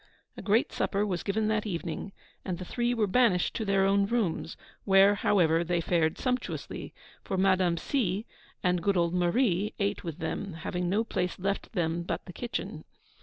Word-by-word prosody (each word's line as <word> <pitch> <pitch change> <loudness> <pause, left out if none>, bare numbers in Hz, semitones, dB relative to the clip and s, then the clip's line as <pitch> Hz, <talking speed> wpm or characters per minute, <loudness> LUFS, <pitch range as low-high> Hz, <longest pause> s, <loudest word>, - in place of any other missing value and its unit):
A - - -8
great 210 +4 +2
supper 200 +1 0
was 180 -4 -2
given 215 +2 0
that 215 0 0
evening, 170 0 -4 0.3
and 185 -3 -3
the 185 - -7
Three 240 +5 -1
were 225 -3 +2
banished 200 -3 +3
to 225 - -2
their 195 -1 +3
own 200 0 +3
rooms; 200 -8 -1 0.3
where, 195 +1 +6
however, 170 -5 +3
they 175 0 0
fared 165 -1 +1
sumptuously, 250 -1 -3 0.3
for 190 - -3
Madame 185 -2 +3
C. 210 -3 -1 0.4
and 180 -2 +2
good 195 +2 +1
old 170 0 +2
Marie 185 +2 +1
ate 200 0 -1
with 165 -4 -5
them, 180 +3 -4
having 175 +2 -3
no 210 +4 +2
place 180 -5 -2
left 195 +4 -3
them 170 -3 0
but 170 - -4
the 180 - -9
kitchen. 240 +6 -5
195 Hz, 175 wpm, -29 LUFS, 175-210 Hz, 0.4 s, where